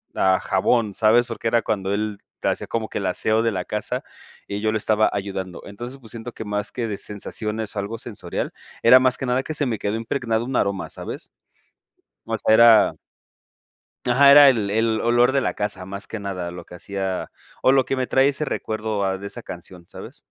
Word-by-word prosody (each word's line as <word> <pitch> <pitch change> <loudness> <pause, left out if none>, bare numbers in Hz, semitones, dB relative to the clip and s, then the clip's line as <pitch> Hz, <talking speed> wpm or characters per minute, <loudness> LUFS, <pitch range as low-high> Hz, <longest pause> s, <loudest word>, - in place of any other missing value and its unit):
a 95 -1 +3
jabón, 105 +2 +1
¿sabes? 115 +4 +4
Porque 115 -1 -4
era 115 0 +3
cuando 100 -3 -2
él 105 0 -2 0.3
hacía - - -1
como 110 -2 -3
que - - -4
el 100 - -2
aseo 110 +4 +1
de 115 -1 +1
la 90 -2 -2
casa 105 +6 -3 0.5
y 100 - -3
yo 110 +1 0
lo - - +1
estaba 110 0 +2
ayudando. 95 -3 -4
Entonces. 120 +6 -8
pues 115 -5 -13
siento 115 +1 -8
que - - -7
más 105 0 -3
que 120 -2 -2
de 100 - -3
sensaciones 105 +1 -5
o - - -1
algo 100 +3 -4
sensorial 105 -8 -5 0.3
era 125 +3 +8
más 130 -1 +2
que - - -4
nada 125 +1 +1
que 155 - -5
se 150 -1 -1
me 115 -5 -2
quedó 105 +1 -2
impregnado 115 0 -1
un 130 +1 -2
aroma, 100 -3 -1
¿sabes? - - -6 1.0
O - - -2
sea, - - +2
era 115 0 +7 1.1
Ajá, 140 +3 +6
era 145 -1 +10
el 110 -6 0
el 110 +1 +1
olor 120 +2 +3
de 135 0 +2
la - - -1
casa 95 -3 -4
más 100 +1 -7
que 110 - -6
nada 95 -3 -4
lo 90 +1 -9
que - - -15
hacía 95 +1 -4 0.3
o, - - +5
lo 135 -1 +4
que - - -1
me 130 -1 -1
trae 135 +1 +4
ese 145 +2 -3
recuerdo 110 -5 -2
a 95 0 -1
de 100 - -6
esa - - -9
canción, 90 -2 -10
¿sabes? - - -10
110 Hz, 215 wpm, -22 LUFS, 100-120 Hz, 1.1 s, era